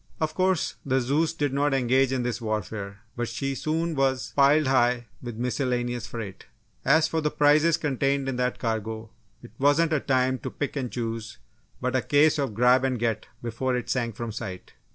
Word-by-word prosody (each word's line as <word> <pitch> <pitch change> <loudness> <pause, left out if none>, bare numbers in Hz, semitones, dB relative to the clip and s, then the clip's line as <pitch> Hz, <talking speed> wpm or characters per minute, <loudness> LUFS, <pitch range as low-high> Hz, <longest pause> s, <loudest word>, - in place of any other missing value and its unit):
Of 155 -1 -1
course, 185 -1 +1
the 135 -1 +1
Zeus 145 +6 +1
did 145 -4 -1
not 140 0 +2
engage 130 +1 +3
in 130 -2 0
this 120 -1 -2
warfare, 105 -2 -4
but 120 -1 -2
she 130 +4 -3
soon 160 +4 -1
was 135 -2 0
piled 145 +2 +5
high 125 -2 +2 0.2
with 120 -3 -6
a - - -8
miscellaneous 120 -2 -1
freight. 105 -5 -7 0.4
As 155 +4 +4
for 160 0 -1
the 150 - +1
prizes 150 +3 +4
contained 140 -1 0
in 135 - -1
that 125 0 0
cargo, 110 -1 -3 0.3
it - - -12
wasn't 150 +4 +3
a 155 - +3
time 130 -1 +1
to - - -5
pick 145 -1 -4
and 130 -4 -3
choose, 115 -2 -4 0.4
but 125 0 -1
a 130 - +3
case 150 +3 +3
of 135 -7 -2
"grab 125 +3 +4
and 130 -1 0
get" 115 -2 -1 0.2
before 120 +2 -1
it 125 - -4
sank 115 -4 -1
from 115 0 -4
sight. 95 -4 -7
130 Hz, 195 wpm, -26 LUFS, 120-145 Hz, 0.4 s, piled